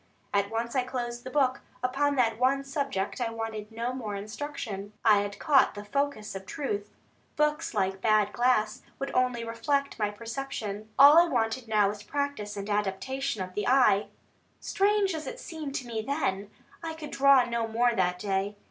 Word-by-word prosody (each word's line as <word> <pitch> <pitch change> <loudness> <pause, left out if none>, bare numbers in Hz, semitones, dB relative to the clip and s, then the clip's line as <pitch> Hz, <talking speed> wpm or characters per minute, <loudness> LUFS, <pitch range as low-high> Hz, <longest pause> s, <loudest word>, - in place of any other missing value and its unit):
At 200 0 +2
once 230 +2 -3
I 260 - +3
closed 240 -1 -4
the 255 - -6
book; 260 -2 +1 0.2
upon 285 +3 +1
that 230 -3 +2
one 270 +2 +2
subject 275 -7 -3
I 235 - 0
wanted 225 -1 -5
no 235 +3 -3
more 220 -5 -4
instruction, 210 -1 -6
I 210 -2 +6
had 205 0 -3
caught 275 -7 +4
the 205 0 -7
focus 280 -1 -2
of 190 0 -8
truth. 205 -7 -3 0.5
Books, 300 -5 0
like 190 -1 0
bad 215 -1 +3
glass, 240 -3 +2 0.2
would 275 - -4
only 250 -2 +1
refract 280 +5 -1
my 210 -1 +1
perception. 220 -2 -5
All 290 +4 +9
I 345 - +5
wanted 225 0 -1
now 210 -2 +3
was 205 0 -6
practice 280 -4 -3
and 200 0 -5
adaptation 210 +4 -1
of 185 0 -9
the 210 - -2
eye. 245 -6 +4 0.5
Strange 400 -1 +1
as 315 -1 -5
it - - -6
seemed 310 - -6
to 260 - -3
me 225 -2 -3
then, 220 -7 -2 0.3
I 325 -1 -5
could 310 -2 -8
draw 275 -2 +5
no 235 -1 -1
more 235 +2 +2
that 180 -4 +1
day. 195 +1 -1
235 Hz, 180 wpm, -28 LUFS, 210-275 Hz, 0.5 s, All